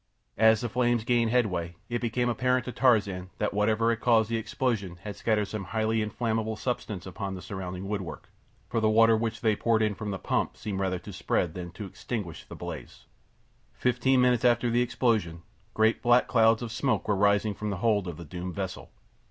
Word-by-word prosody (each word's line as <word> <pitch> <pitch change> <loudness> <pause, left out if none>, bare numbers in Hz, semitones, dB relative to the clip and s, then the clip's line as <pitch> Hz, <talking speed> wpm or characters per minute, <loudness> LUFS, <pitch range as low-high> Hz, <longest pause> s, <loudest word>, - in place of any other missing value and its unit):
As 110 -1 +5
the 120 - -1
flames 120 -1 +1
gained 120 -1 +2
headway 90 -8 0
it 120 -1 -2
became 120 +1 0
apparent 125 +1 +1
to 125 - -4
Tarzan 105 -7 +2
that 105 -1 -1
whatever 110 +2 +2
had 115 - -2
caused 115 -2 +3
the - - +1
explosion 110 -5 -2
had 105 -1 -6
scattered 110 -2 +1
some 105 -2 -5
highly 110 +2 0
inflammable 110 0 -1
substance 105 -5 -4
upon 95 +1 -5
the 90 - -8
surrounding 95 0 -6
woodwork, 100 -4 -5 0.4
for 120 - -1
the 110 -1 +2
water 115 +1 +5
which 115 0 -2
they 110 -2 +2
poured 110 0 +2
in 105 -1 +1
from 105 +2 -5
the 100 - -3
pump - - -1
seemed 100 -3 -4
rather 95 -1 0
to 95 +3 -10
spread 90 -2 -1
than 90 0 -6
to 105 - -7
extinguish 105 -4 -6
the - - -10
blaze. - - -8 0.7
Fifteen 125 +1 +2
minutes 125 -2 +3
after 120 -1 +3
the 120 +1 +3
explosion 110 -9 0 0.3
great, 110 +1 +3
black 120 +1 +4
clouds 115 -1 +4
of 115 - -5
smoke 120 -1 0
were 105 - +2
rising 100 +1 +2
from 105 +1 -4
the 100 - -2
hold 105 -2 +1
of 85 -3 -6
the 85 - -9
doomed 90 +3 -6
vessel. 95 -2 -5
110 Hz, 200 wpm, -28 LUFS, 100-120 Hz, 0.7 s, As